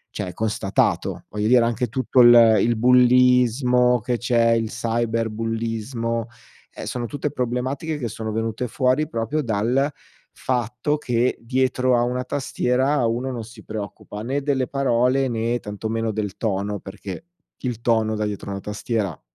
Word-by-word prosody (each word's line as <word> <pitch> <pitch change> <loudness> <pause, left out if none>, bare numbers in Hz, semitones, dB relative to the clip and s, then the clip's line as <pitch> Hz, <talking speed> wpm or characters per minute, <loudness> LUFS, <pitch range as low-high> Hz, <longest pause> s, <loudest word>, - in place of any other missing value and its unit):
cioè 90 - -4
constatato. 110 -2 -1
Voglio 105 0 -2
dire 120 0 +5
anche 120 +2 0
tutto 130 +2 +1
il 120 -2 +8
il 120 +2 +2
bullismo 125 0 +4
che 120 +1 -2
c'è, 115 -1 +2
il 115 -1 +1
cyberbullismo, 115 0 -2 0.5
ehm, - - -8
sono 120 -1 -3
tutte 145 +1 -3
problematiche 130 +4 -2
che 120 -5 -3
sono 110 0 -5
venute 115 +2 -2
fuori 130 +5 +1
proprio 115 +4 -2
dal 120 +3 +1 0.4
fatto 125 +3 -1
che 125 -2 0
dietro 130 +1 +1
a 120 - +2
una 125 +1 -1
tastiera 130 0 0
uno 120 +3 -1
non 120 -3 -5
si 115 -1 -13
preoccupa 105 0 -7
né 135 +4 -2
delle 135 -3 0
parole, 130 0 +1
né 115 +1 -1
tantomeno 110 +2 -3
del 105 -2 -3
tono, 100 -1 -2
perché 100 - -8 0.3
il 120 -3 -4
tono 110 -2 +1
da 105 - -1
dietro 100 -1 -5
a - - -3
una 100 - -5
tastiera 105 -4 -3
120 Hz, 150 wpm, -22 LUFS, 110-125 Hz, 0.5 s, il